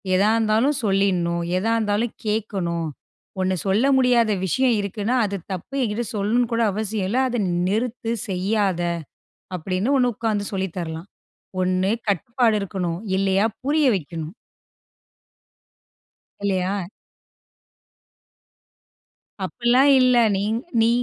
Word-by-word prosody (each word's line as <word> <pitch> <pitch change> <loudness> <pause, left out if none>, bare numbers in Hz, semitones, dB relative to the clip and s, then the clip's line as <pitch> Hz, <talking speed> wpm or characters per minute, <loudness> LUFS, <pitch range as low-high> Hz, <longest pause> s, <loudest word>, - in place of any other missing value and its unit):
எதா 200 +3 +4
இருந்தாலும் 225 +6 +2
சொல்லிர்ணும், 185 -4 +1
எதா 220 +5 0
இருந்தாலும் 215 +2 0
கேக்கணும். 190 -6 -1 0.5
ஒண்ணு 185 0 +1
சொல்ல 210 +7 +3
முடியாத 245 -3 +3
விஷயம் 250 +6 +2
இருக்குன்னா 205 +4 -2
அது 200 -1 -3 0.2
தப்பு 185 +9 -7
என்கிட்ட 235 0 -1
சொல்லணும்னு 225 +4 +1
கூட 230 0 +2
அவசியம் 215 -2 -2
இல்ல, 245 - +1
அத 245 -1 -1 0.3
நிறுத்து 230 +3 -1 0.2
செய்யாதே. 190 -2 0 0.7
அப்டினு 185 - -1
ஒண்ணு 250 -1 +2
உக்கார்ந்து 215 -3 -1
சொல்லி 190 -1 -1
தரலாம். 165 +1 -5 0.5
ஒண்ணு 185 +1 +1 0.2
கட்டுப்பாடு 230 - +1
இருக்கணும். 180 -3 -3 0.2
இல்லயா 195 +1 +2 0.2
புரிய 300 +1 +2
வைக்கணும். 165 -1 -5 2.1
இல்லையா? 190 -1 0 2.7
அப்டில்லாம் 245 +8 +3
இல்ல. 255 -1 +4 0.2
நீ 195 - -1 0.4
நீ 225 - +4
205 Hz, 105 wpm, -23 LUFS, 185-235 Hz, 2.7 s, எதா